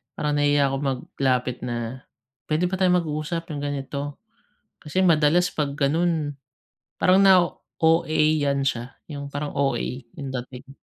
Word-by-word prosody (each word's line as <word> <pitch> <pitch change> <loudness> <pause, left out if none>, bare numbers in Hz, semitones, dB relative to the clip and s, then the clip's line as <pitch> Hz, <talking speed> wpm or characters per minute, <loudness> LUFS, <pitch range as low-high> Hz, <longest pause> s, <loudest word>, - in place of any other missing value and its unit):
Parang 150 -1 -1
nahihiya 145 -1 +3
akong 135 +1 -2
maglapit 130 -1 -1
na, 120 +1 -4 0.4
"Pwede 155 +4 +2
ba 190 - -1
tayong 180 -1 +4
mag-usap, 160 +2 -4
'yung 145 - -4
ganito?" 145 0 -4 0.6
Kasi 165 +4 -1
madalas 165 +1 +4
'pag 145 -2 -2
ganun, 150 0 +1 0.7
parang 185 +1 +5
nao-OA-yan 155 -5 +3
siya. 125 0 -2 0.2
'Yung 140 -1 -5
parang 145 +1 -3
OA 135 -4 +1 0.4
'yung 140 -4 -5
dating. 130 +1 -7
145 Hz, 125 wpm, -24 LUFS, 135-160 Hz, 0.7 s, parang